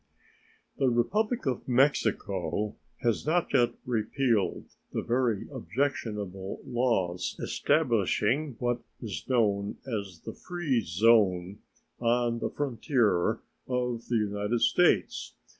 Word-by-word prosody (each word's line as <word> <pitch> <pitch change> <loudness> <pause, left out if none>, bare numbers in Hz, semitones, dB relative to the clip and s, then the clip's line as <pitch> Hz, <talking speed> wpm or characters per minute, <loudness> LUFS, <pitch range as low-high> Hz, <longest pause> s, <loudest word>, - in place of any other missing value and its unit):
The 135 -2 +3
Republic 210 - +1
of 130 -3 -2
Mexico 110 -6 +1 0.3
has 115 -3 +1
not 170 +3 +1
yet 120 -3 +4
repealed 115 -1 0 0.3
the - - -2
very 120 -4 0
objectionable 105 -8 -3
laws 105 -8 0
establishing 135 +5 +1
what 120 -1 -1 0.2
is 100 -10 -5
known 105 -5 +1
as 100 -9 -4
the - - -5
"free 175 -9 -1
zone" 95 -1 +3 0.4
on 120 0 +1
the - - -1
frontier 120 - +1 0.3
of 125 -2 -2
the 120 - 0
United 105 +2 -1
States. - - +2
115 Hz, 105 wpm, -29 LUFS, 105-130 Hz, 0.4 s, yet